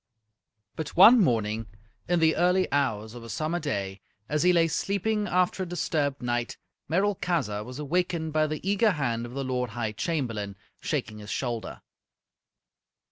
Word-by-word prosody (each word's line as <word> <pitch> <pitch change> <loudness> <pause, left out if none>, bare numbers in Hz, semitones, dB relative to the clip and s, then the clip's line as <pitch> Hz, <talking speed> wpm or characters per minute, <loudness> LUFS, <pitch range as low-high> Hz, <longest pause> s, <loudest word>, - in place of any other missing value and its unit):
But 155 -3 -5
one 225 +7 +9
morning, 115 - +1 0.4
in 175 0 +2
the 160 -1 +4
early 180 +2 +3
hours 110 -6 0
of 120 -1 -9
a 115 - -10
summer 155 +8 -1
day, 100 - -3 0.3
as 150 0 0
he 180 - +5
lay 170 -2 +4
sleeping 205 +5 -1
after 180 +1 +1
a - - -1
disturbed 145 -6 -1
night, 120 0 -2 0.3
Merolchazzar 170 - 0
was 125 +3 -8
awakened 160 +1 -1
by 155 0 +3
the 155 +4 -5
eager 205 +1 +3
hand 120 -6 -2
of 120 - -10
the 140 - -2
Lord 125 -1 -1
High 110 -3 -1
Chamberlain, 115 - -2 0.2
shaking 110 0 -3
his 105 -1 -10
shoulder. 120 -2 -4
150 Hz, 155 wpm, -27 LUFS, 115-175 Hz, 0.4 s, one